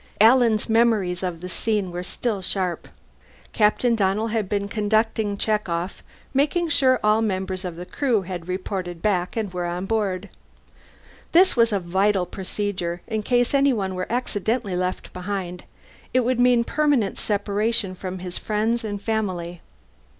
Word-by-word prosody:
Alan's 225 -1 +5
memories 220 -6 +2
of 180 -3 -3
the 180 - -5
scene 205 -1 -1
were 175 +1 -4
still 205 +2 -3
sharp. 185 -2 -2 0.7
Captain 225 +3 +3
Donnell 210 +1 +1
had 215 -3 -1
been 200 -1 -1
conducting 215 0 0
check 210 -2 0
off, 170 +3 -3 0.3
making 305 +5 +1
sure 265 -4 +3
all 215 +1 +4
members 190 -3 -2
of 180 -3 -5
the 175 +1 -7
Crew 235 -2 0
had 180 -2 -6
reported 185 -2 -4
back 185 -1 0
and 210 -4 -2
were 175 -1 -2
aboard. 190 +2 -2 1.0
This 365 +3 +6
was 230 -2 +4
a 200 - +1
vital 190 +2 +1
procedure; 185 -2 -4
in 220 -2 -2
case 245 +3 +1
anyone 250 -9 +2
were 185 +2 -4
accidentally 225 -3 -1
left 180 +1 -3
behind, 180 -1 -4 0.5
it 255 - +5
would 250 0 0
mean 245 -1 +5
permanent 285 -7 +1
separation 205 0 0
from 185 0 -6
his 180 -1 -6
friends 220 +2 0
and 205 -2 -3
family. 185 -5 -2
205 Hz, 150 wpm, -23 LUFS, 185-225 Hz, 1.0 s, This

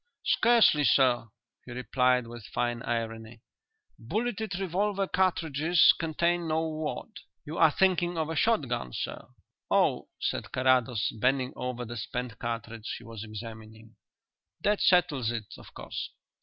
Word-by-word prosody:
"Scarcely, 230 -11 +5
sir," 125 -4 +3 0.4
he - - -8
replied, 125 +1 +1
with 115 -2 -10
fine 120 -1 -2
irony. 115 -1 -4 0.6
"Bulleted 210 - -2
revolver 195 +2 0
cartridges 170 -3 +3
contain 170 +1 0
no 160 +1 0
wad. 155 +6 -4 0.4
You 155 +3 -5
are 160 - +7
thinking 175 0 +1
of 160 -1 0
a 160 - -4
shot 220 - +2
gun, 90 - -3
sir." - - -5 0.4
"Oh," - - +2
said - - -3
Carrados, 130 -3 +2
bending 130 +2 +1
over 125 -1 -4
the 120 +1 -7
spent 120 +1 -5
cartridge 115 -1 -4
he - - -13
was 115 -2 -8
examining, 110 0 -10 0.7
"that 210 0 +1
settles 160 -10 +3
it, 115 -3 -5
of - - -14
course." - - -5
130 Hz, 135 wpm, -28 LUFS, 115-170 Hz, 0.7 s, are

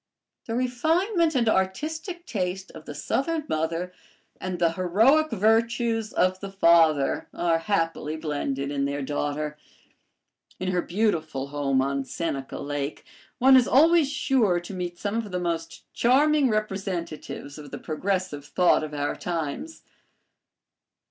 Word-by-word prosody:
The 225 - -2
refinement 320 - +1
and 235 -3 +2
artistic 315 - -1
taste 190 - -3
of - - -12
the - - -7
Southern 330 -2 -1
mother 165 +3 -2 0.5
and 185 -1 -3
the 170 -1 +2
heroic 220 - +3
virtues 225 +1 +1
of 185 +1 +1
the 195 0 -7
father 165 -6 +4
are 170 -1 +1
happily 165 -4 -1
blended 145 -3 -3
in 140 -1 0
their 140 0 -2
daughter. 150 +2 -3 1.0
In 185 0 -1
her 180 -1 +1
beautiful 160 -9 -1
home 140 -2 +1
on 140 0 -1
Seneca 140 -2 -4
Lake, 145 0 -4 0.3
one 265 0 +6
is 255 -2 +6
always 315 +1 +5
sure 245 -11 +2
to 175 +3 -9
meet 175 -1 -4
some 205 +3 -2
of 225 -3 -3
the 180 - -1
most 165 -2 -3
charming 280 +3 +4
representatives 190 -8 -4
of 145 -1 -10
the - - -6
progressive 180 -2 -2
thought 175 +1 +3
of 150 -1 -5
our 145 0 -1
times. 175 - -4
185 Hz, 135 wpm, -26 LUFS, 155-230 Hz, 1.0 s, one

